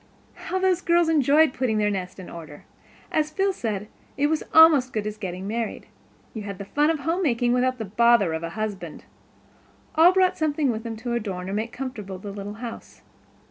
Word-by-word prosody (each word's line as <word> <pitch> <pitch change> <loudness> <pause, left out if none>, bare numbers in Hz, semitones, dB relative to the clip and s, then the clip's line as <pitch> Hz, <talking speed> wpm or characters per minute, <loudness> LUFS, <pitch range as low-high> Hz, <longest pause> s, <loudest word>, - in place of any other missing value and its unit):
How 375 - -4
those 375 -1 +2
girls 340 -1 +3
enjoyed 300 -1 +4
putting 245 -4 0
their 210 -1 +1
nest 185 -2 -4
in 185 - -9
order! 155 -3 -10 0.5
As 305 -1 +1
Phil 385 +5 0
said, 210 - -4 0.3
it 285 - +2
was 315 - 0
almost 320 -5 +7
as - - -23
good 215 -2 -2
as 210 0 -3
getting 190 -3 -6
married. 225 +2 -3 0.5
You 220 - -5
had 200 -2 -6
the 200 - -7
fun 295 +9 +1
of 320 -3 -1
homemaking 275 -8 +1
without 255 +1 +1
the 220 - -4
bother 210 -3 +3
of 160 - -3
a 165 - -4
husband. 215 +1 -5 0.9
All 330 +3 +7
brought 370 -1 +2
something 295 -3 +1
with 220 -1 -4
them 225 -1 -5
to 235 +2 -4
adorn 195 -5 -3
or - - -3
make 220 +3 -2
comfortable 215 -8 -6
the 200 +2 -8
little 200 +1 -7
house. 230 +1 -9
235 Hz, 200 wpm, -24 LUFS, 205-300 Hz, 0.9 s, almost